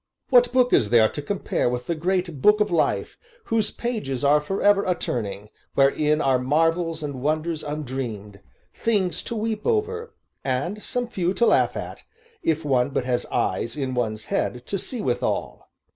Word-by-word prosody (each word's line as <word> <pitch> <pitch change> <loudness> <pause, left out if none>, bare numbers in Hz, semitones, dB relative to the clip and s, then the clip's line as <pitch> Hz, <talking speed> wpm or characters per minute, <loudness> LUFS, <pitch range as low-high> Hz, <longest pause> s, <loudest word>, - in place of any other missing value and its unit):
What 245 -1 +6
book 250 -1 +3
is 110 -6 +4
there 115 -1 +6
to 145 - -5
compare 185 -5 -1
with 125 0 -3
the 170 - -1
great 170 -2 -1
Book 210 +5 +5
of 210 -2 +1
Life 170 - 0 0.2
whose 225 - 0
pages 210 - -3
are 145 +1 +5
forever 200 +5 +2
a 180 - +1
turning, 105 -6 -4 0.3
wherein 150 +2 +3
are 135 -3 +3
marvels 165 +4 +1
and 140 -4 -5
wonders 155 +2 -1
undreamed; 125 -9 -5 0.3
things 195 -7 0
to 235 - -5
weep 220 -1 -2
over, 455 +1 -1 0.3
and 140 +11 -2
some 245 +3 -2
few 185 -5 -1
to 235 - +3
laugh - - +3
at, - - -6 0.4
if 160 -1 0
one 130 -2 +2
but 135 -2 -2
has 125 -1 -1
eyes 115 +4 -1
in 135 -3 -2
one's 110 -3 -2
head 125 0 -2
to 195 - -3
see 245 +3 -4
withal? - - -2
155 Hz, 170 wpm, -24 LUFS, 130-205 Hz, 0.4 s, What